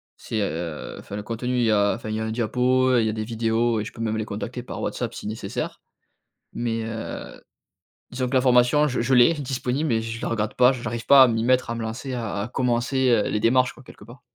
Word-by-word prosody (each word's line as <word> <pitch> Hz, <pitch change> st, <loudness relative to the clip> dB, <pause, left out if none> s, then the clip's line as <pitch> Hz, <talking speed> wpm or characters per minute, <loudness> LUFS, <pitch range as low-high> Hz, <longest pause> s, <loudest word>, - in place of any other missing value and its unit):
C'est, 110 Hz, -, -4 dB
heu 80 Hz, -3 st, -4 dB
enfin 100 Hz, -, -8 dB
le 105 Hz, -, -5 dB
contenu, 120 Hz, +3 st, -3 dB
il 120 Hz, -, +2 dB
y 110 Hz, -, +3 dB
a 100 Hz, -1 st, +3 dB
enfin, 110 Hz, -2 st, -7 dB
il 110 Hz, -, -2 dB
y -, -, -2 dB
a -, -, -2 dB
un 110 Hz, -, -3 dB
diapo, 125 Hz, +3 st, +1 dB
heu, 120 Hz, -2 st, +4 dB
il -, -, +1 dB
y -, -, +1 dB
a -, -, -2 dB
des 110 Hz, -1 st, -3 dB
vidéos 115 Hz, 0 st, 0 dB
et -, -, -5 dB
je -, -, -7 dB
peux 115 Hz, -, -9 dB
même 110 Hz, -1 st, -1 dB
les 110 Hz, -, -1 dB
contacter 115 Hz, +4 st, -5 dB
par -, -, -7 dB
WhatsApp -, -, -3 dB
si -, -, -7 dB
nécessaire. 110 Hz, +1 st, -5 dB, 0.7 s
Mais, 115 Hz, -1 st, -2 dB
heu, 110 Hz, 0 st, -6 dB, 0.7 s
disons 125 Hz, 0 st, -2 dB
que 130 Hz, -, -4 dB
la 130 Hz, -, +4 dB
formation, 125 Hz, +3 st, +4 dB
je 130 Hz, -, -2 dB
je 125 Hz, +3 st, +2 dB
l'ai, 125 Hz, +6 st, +6 dB
disponible, 135 Hz, +1 st, -2 dB
mais 110 Hz, -2 st, +1 dB
je 115 Hz, 0 st, -5 dB
la -, -, -1 dB
regarde 110 Hz, -2 st, -2 dB
pas, 125 Hz, 0 st, +5 dB
je 125 Hz, -2 st, -7 dB
j'arrive 115 Hz, +1 st, -4 dB
pas 140 Hz, -1 st, +9 dB
à 130 Hz, -, +7 dB
m'y 115 Hz, 0 st, 0 dB
mettre, 130 Hz, -1 st, +2 dB
à -, -, -2 dB
me 115 Hz, -, -5 dB
lancer, 120 Hz, +4 st, -5 dB
à 110 Hz, -4 st, -3 dB
à 110 Hz, -, -4 dB
commencer, 125 Hz, +1 st, 0 dB
heu, 115 Hz, -4 st, +3 dB
les 105 Hz, -, -1 dB
démarches, 125 Hz, +2 st, +3 dB
quoi, -, -, -16 dB
quelque 105 Hz, -, -15 dB
part. 120 Hz, +3 st, -14 dB
120 Hz, 265 wpm, -24 LUFS, 110-125 Hz, 0.7 s, pas